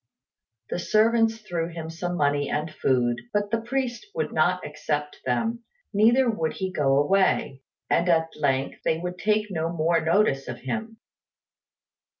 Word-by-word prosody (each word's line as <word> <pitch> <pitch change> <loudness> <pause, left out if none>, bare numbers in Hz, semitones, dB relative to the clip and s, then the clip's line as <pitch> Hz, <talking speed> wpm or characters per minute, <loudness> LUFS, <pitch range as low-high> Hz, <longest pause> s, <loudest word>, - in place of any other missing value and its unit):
The - - -1
servants 225 +3 +3
threw 170 -3 -1
him 165 -1 -7
some 175 +2 -3
money 145 -1 +1
and 155 +1 -2
food, 120 -4 +1
but 205 0 -1
the 230 0 +1
priest 255 +6 -3
would 475 - -2
not 180 +4 +2
accept 150 0 -3
them, 225 - -1 0.3
neither 235 +5 +4
would 165 -9 0
he 190 -1 -3
go 140 -6 +2
away; 145 -4 +2 0.3
and 175 - +2
at 165 -1 +3
length 135 -3 0
they 160 - +1
would 180 +2 -5
take 210 -1 +1
no 165 -2 -1
more 165 0 +1
notice 160 -4 +2
of 120 -1 -6
him. 225 - -4
170 Hz, 150 wpm, -25 LUFS, 150-215 Hz, 0.3 s, neither